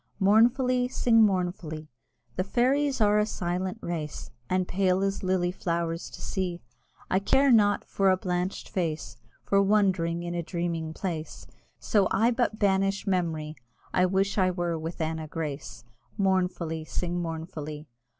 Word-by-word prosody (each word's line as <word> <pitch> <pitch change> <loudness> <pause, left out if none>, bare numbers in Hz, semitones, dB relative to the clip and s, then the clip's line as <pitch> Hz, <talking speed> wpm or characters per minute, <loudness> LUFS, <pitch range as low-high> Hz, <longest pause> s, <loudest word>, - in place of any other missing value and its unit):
(Mournfully, 245 +5 +4
sing 235 -2 +3
mournfully) 180 -6 0 0.4
The 185 - 0
Fairies 265 +6 +1
are 210 0 +4
a 210 - +3
silent 185 +1 -2
race, 160 -4 -5 0.2
And 185 -1 +1
pale 190 0 +1
as 195 0 -1
lily 185 -1 +1
flowers 170 -2 -2
to - - -11
see; 180 -3 -2 0.5
I 190 - +4
care 270 +7 +3
not 205 -3 +4
for 195 -1 +2
a 185 - +4
blanched 180 0 -2
face, 155 - -3 0.3
For 200 0 +3
wandering 190 -5 +2
in 175 0 -4
a 175 - -1
dreaming 170 -2 -3
place, 160 -2 -5 0.3
So 200 -3 +2
I 230 +4 +3
but 235 -3 0
banish 195 -1 +1
memory: 160 -5 -1 0.4
I 180 0 +4
wish 195 +2 +1
I 185 -1 +4
were 175 -2 -1
with 165 +1 -5
Anna 160 0 -2
Grace!" 150 -5 -5 0.3
Mournfully, 180 -5 0
sing 175 +2 -3
mournfully! 160 -2 -6
185 Hz, 145 wpm, -27 LUFS, 165-200 Hz, 0.5 s, Mournfully